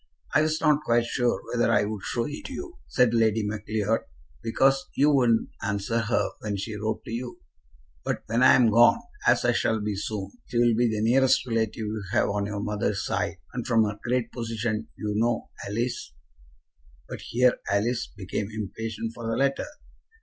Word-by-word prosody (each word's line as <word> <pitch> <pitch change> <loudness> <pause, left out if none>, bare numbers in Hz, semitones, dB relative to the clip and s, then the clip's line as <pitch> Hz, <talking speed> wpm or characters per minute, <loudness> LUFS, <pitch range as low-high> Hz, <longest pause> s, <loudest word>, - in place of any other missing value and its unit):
"I - - +5
was 155 +1 +1
not 150 -1 +3
quite 120 -4 +2
sure 120 0 0
whether 120 -1 +2
I'd - - +3 0.2
show 115 +4 -2
it 150 - -6
you," 355 +6 -7
said 125 -2 +3
Lady 110 -2 +2
Macleod, 105 +1 -1 0.4
"because 135 +4 +2
you 145 +2 +4
wouldn't 120 -5 +3
answer 100 +2 -1
her 115 0 +1
when 105 -2 -3
she 105 +3 -4
wrote 110 +1 -3
to - - -7
you. 120 +1 -5 0.6
But - - -2
when 115 +3 0
I'm 125 -3 +6
gone, 120 - +6 0.3
as - - +4
I 120 - +5
shall 110 -1 +1
be 105 -1 -2
soon, 100 0 -4 0.2
she 120 - -3
will 120 -1 +4
be 120 +2 +3
the 110 -1 -1
nearest 130 +4 +4
relative 115 -3 0
you 110 -1 -4
have - - +3
on 100 0 -1
your 100 -1 -3
mother's 105 -1 -1
side, - - -1 0.2
and - - -4
from 115 -1 +4
her 105 -1 -3
great 120 -1 0
position, 115 -2 -3
you 105 -1 -2
know, 115 +2 0 0.2
Alice 115 - -3 0.5
" 65 0 -33
But - - -7
here 125 +1 +2
Alice 115 +4 +1
became 100 +1 -3
impatient 110 +1 -4
for 115 0 -6
the 115 - -1
letter. 135 0 +1
115 Hz, 180 wpm, -26 LUFS, 105-120 Hz, 0.6 s, I'm